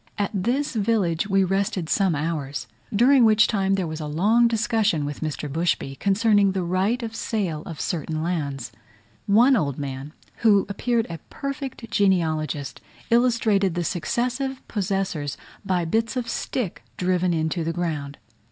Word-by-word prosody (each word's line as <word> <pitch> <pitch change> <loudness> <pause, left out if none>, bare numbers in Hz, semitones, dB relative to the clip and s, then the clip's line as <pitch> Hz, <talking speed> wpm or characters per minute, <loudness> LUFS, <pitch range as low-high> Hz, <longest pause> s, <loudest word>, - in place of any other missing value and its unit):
At 205 - -1
this 245 +10 0
village 200 -6 +1
we 195 -1 +3
rested 195 -1 0
some 190 -1 +2
hours, 145 -2 -3 0.3
during 245 +5 +5
which 215 -1 +6
time 195 -2 +1
there 190 -2 -1
was 160 -1 -5
a 155 - -4
long 210 +10 +3
discussion 220 -8 +1
with 145 0 -5
Mr. 155 -1 -3
Bushby, 145 -3 -1
concerning 200 -1 +3
the 190 -2 -1
right 190 +8 0
of 225 -1 -5
sale 185 -11 -2
of 165 - -7
certain 155 -1 -2
lands. 145 -7 -3 0.6
One 235 +7 +6
old 140 - 0
man, 140 +1 -5 0.2
who 205 -4 +4
appeared 230 +3 0
a 165 -1 -7
perfect 275 -4 -6
genealogist, 160 -7 0 0.3
illustrated 225 -6 +3
the 175 - 0
successive 250 - -2
possessors 190 -8 -2 0.3
by 185 -3 0
bits 225 +8 0
of 245 -2 -2
stick 230 -3 -3 0.2
driven 180 0 +1
into 160 0 0
the 165 - -1
ground. 155 -5 -3
190 Hz, 150 wpm, -24 LUFS, 160-225 Hz, 0.6 s, which